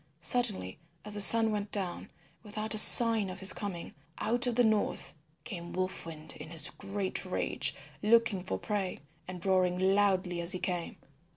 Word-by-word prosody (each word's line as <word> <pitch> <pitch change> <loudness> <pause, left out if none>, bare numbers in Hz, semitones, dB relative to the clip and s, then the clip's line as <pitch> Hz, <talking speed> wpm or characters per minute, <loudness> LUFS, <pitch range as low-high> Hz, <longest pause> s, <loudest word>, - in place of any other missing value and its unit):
Suddenly 205 - 0 0.3
as 210 - -8
the 205 - 0
sun 225 +3 +5
went 205 -1 -6
down, 190 -4 -6 0.3
without 215 0 -3
a 215 - +5
sign 225 -3 +8
of 185 - -10
his 190 - +7
coming, 190 -5 -9 0.2
out 245 +3 -2
of 240 - -3
the 245 - +1
north 220 -2 -3 0.3
came 175 -7 -10
Wolf 185 -2 -6
Wind 160 -1 -10
in - - -12
his 165 -1 -1
great 195 -1 -6
rage - - -3 0.3
looking 225 -2 0
for 190 - -6
prey, 200 -3 -6 0.3
and 180 -1 -10
roaring 185 -2 -1
loudly 190 -2 -1
as 170 +3 +1
he 185 - -4
came. 180 -1 -6
195 Hz, 170 wpm, -28 LUFS, 180-215 Hz, 0.3 s, sign